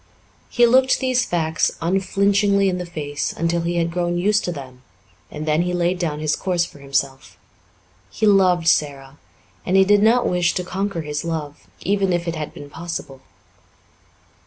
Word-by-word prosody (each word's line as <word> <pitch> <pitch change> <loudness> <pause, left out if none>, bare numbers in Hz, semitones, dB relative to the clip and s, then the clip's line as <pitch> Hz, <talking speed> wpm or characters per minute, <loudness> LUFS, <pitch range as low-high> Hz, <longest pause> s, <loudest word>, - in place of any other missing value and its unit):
He 240 - +4
looked 260 +2 +4
these 255 -1 +1
facts 160 -2 -1
unflinchingly 200 +2 +2
in 180 -1 -2
the 180 - -5
face 145 -4 -4
until 170 +1 -1
he 170 +1 -2
had 170 -1 0
grown 175 0 -1
used 210 +4 +2
to 175 - -2
them, 130 -5 -9 0.5
and 150 0 -6
then 155 +2 +2
he 180 0 -1
laid 175 +1 0
down 155 -4 -2
his 155 0 0
course 180 -3 0
for 145 - -14
himself. 135 -1 -3 0.7
He 220 - -2
loved 185 -5 +3
Sara 140 -3 0 0.4
and 185 - +1
he 190 - +6
did 205 +1 +4
not 230 +3 +4
wish 180 -1 +1
to 180 - -1
conquer 190 -1 -3
his 150 0 -4
love, 155 -3 -5
even 195 -1 +1
if 175 0 -2
it 170 - -2
had 155 -1 -5
been 145 - -11
possible. 145 -4 -7
175 Hz, 175 wpm, -21 LUFS, 155-195 Hz, 0.7 s, he